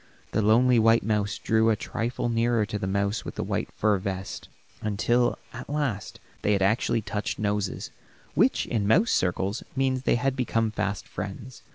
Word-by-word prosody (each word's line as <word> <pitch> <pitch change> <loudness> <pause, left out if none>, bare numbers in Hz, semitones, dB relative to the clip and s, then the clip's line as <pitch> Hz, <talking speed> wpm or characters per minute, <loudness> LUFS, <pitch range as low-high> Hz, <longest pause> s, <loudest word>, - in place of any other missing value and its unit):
The 110 - +1
lonely 120 +3 +5
white 115 +1 +4
mouse 105 -1 0
drew 110 0 +2
a 110 - +4
trifle 115 +3 -3
nearer 115 -1 +2
to 105 0 -4
the 95 - -2
mouse 100 +2 0
with - - -7
the - - -2
white - - -2
fur 105 -2 +1
vest, 95 0 -5 0.3
until 120 +4 +1 0.2
at 125 - -8
last 140 -9 -2 0.2
they 105 - +2
had 100 -1 +2
actually 110 +2 +2
touched 105 0 -3
noses, 105 -2 -2 0.4
which, - - +3
in 105 -4 -1
mouse 195 - +4
circles, 95 +4 0
means 130 -1 +1
they 130 - +2
had 130 +2 0
become 115 -4 0
fast 100 -2 -3
friends. 110 +5 -7
110 Hz, 175 wpm, -26 LUFS, 100-120 Hz, 0.4 s, lonely